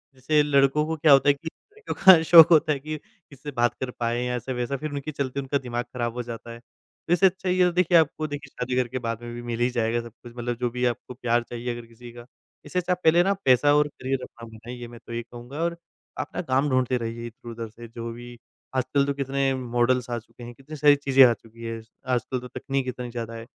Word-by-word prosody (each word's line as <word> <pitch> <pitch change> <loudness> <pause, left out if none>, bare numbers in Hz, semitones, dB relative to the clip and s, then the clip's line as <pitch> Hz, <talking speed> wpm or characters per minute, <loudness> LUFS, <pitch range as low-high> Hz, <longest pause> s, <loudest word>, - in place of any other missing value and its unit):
जैसे 150 +4 +2
लड़कों 140 +1 +3
को 160 - -1
क्या 150 0 +4
होता 135 +1 +5
है - - +6
कि 145 +4 -11
लड़कियों 420 - -8
का 185 -4 +10
शौक 165 -1 +9
होता 155 -1 +5
है 140 - -4
कि 155 +3 -5
किससे 145 -3 -13
बात 120 -2 +1
कर 130 -1 -3
पाएँ 120 +1 0
या 125 0 -1
ऐसा-वैसा 125 +2 -3
फिर 155 +2 -5
उनकी 145 +1 -4
चलते 140 -2 -3
उनका 140 +1 -1
दिमाग 120 -2 -4
खराब 120 -2 -2
हो 125 0 -4
जाता 115 0 -8
है। 115 - -9 0.5
तो 170 - +3
इससे 175 +2 +4
अच्छा 190 0 +1
ये 180 0 +3
तो 180 - +2
देखिए, 180 0 +4
आपको 155 -1 +1
देखिए 145 -1 -7
शादी 125 0 -4
करके 130 0 -1
बाद 115 -1 -4
में 120 0 -7
भी 120 - -6
मिल 120 -1 -4
ही 120 +1 +2
जाएगा 120 -1 0
सब 115 0 -11
कुछ 120 - -11
मतलब 120 0 -3
जो 125 -1 0
भी 125 +1 -2
आपको 120 +1 -2
प्यार 120 -1 0
चाहिए 120 +1 -4
अगर 120 - -9
किसी 120 +1 -13
का। 120 0 -11 0.4
इससे 165 +5 -1
अच्छा 180 +1 0
पहले 175 -1 +4
ना 195 - +1
आप 200 - -1
पैसा 135 +3 +5
और 150 0 +3
करियर 135 -2 -4
अपना 115 - -11
बनाइए 120 +2 -9
मैं 120 0 -12
तो 120 - -8
यही 120 - -2
कहूँगा 120 +3 -11
और 170 0 -1 0.4
आप - - -3
ना - - -1
काम 140 -2 +1
ढूँढते 130 -1 +1
रहिए 115 0 -5
इधर-उधर 115 0 -8
से, 115 +2 -12
जो 115 0 -7
भी 120 +1 -10 0.4
आजकल 130 +2 +1
तो 140 - -1
कितने 135 0 0
मॉडल्स 125 0 0
आ 120 - -1
चुके 120 +2 -16
हैं, 120 0 -8
कितनी 135 +5 -11
सारी 145 -1 +5
चीज़ें 135 -1 +5
आ 120 - +4
चुकीं 115 0 -13
हैं 115 0 -4
ज 110 - -22 0.3
आजकल 125 +1 -1
तो 125 - -9
तकनीक 135 +1 -3
इतनी 125 -1 -5
ज़्यादा 115 -1 -5
है। 115 0 -8
125 Hz, 250 wpm, -25 LUFS, 120-145 Hz, 0.5 s, का